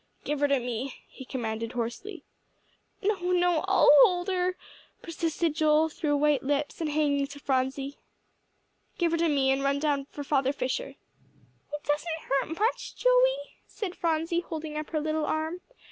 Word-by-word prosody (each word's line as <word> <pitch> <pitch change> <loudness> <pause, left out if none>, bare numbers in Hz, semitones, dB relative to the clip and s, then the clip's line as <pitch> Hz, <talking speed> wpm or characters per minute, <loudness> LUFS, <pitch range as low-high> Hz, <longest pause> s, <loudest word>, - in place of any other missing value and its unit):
"Give 295 -1 -2
her 290 - +3
to 280 -1 +3
me," 245 +2 -4
he 265 - -11
commanded 230 -2 -4
hoarsely. 245 - -5 0.8
"No, 405 0 +1
no 355 -2 +3
I'll 390 - +6
hold 355 +5 +4
her," 365 -1 0 0.5
persisted 335 -1 -1
Joel, 310 +1 +3
through 290 -1 -1
white 295 -1 +3
lips, 290 +3 -2
and 315 - 0
hanging 290 -2 +1
to 285 0 -10
Phronsie. 270 +1 -1 1.0
"Give 340 -2 +1
her 335 - +1
to 335 -1 +2
me, 275 -2 +3
and 270 +1 +1
run 275 0 +2
down 285 -2 0
for 290 - -7
Father 275 -1 +1
Fisher." 290 - -3 0.8
"It 295 0 -5
doesn't 320 +2 -1
hurt 290 +5 0
much, 445 +3 -1
Joey," - - +2
said 370 -4 -5
Phronsie, 330 0 0
holding 315 -3 -6
up 305 0 -4
her 310 - -1
little 310 0 -1
arm. 315 +3 -2
305 Hz, 160 wpm, -28 LUFS, 275-340 Hz, 1.0 s, I'll